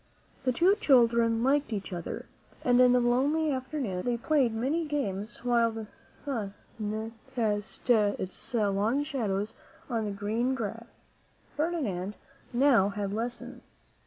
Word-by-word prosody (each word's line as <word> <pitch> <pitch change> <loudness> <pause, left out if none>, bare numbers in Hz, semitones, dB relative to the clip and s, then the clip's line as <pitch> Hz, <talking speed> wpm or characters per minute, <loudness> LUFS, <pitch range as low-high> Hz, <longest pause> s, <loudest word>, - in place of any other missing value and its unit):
The 255 - +4
two 350 +10 +4
children 235 -3 +4
liked 280 0 +2
each 200 -3 -4
other, 170 -2 -5 0.4
and 245 0 +5
in 250 -1 +7
the 250 - +5
lonely 280 +6 +2
afternoons 260 -8 -3
they 245 -1 0
played 265 -1 +2
many 265 +9 0
games 235 -7 -3
while 235 -1 +4
the 225 -1 -6
sun 215 -2 -6 0.8
cast 210 -2 -2
its 210 -2 +1
long 215 +5 +2
shadows 215 -6 -2 0.4
on 225 -2 0
the 205 - -2
green 220 +6 -1
grass. 230 0 -6 0.5
Ferdinand 235 - -1 0.4
now 240 -6 +4
had 200 -1 -3
lessons. 235 +3 -5
235 Hz, 130 wpm, -29 LUFS, 210-265 Hz, 0.8 s, in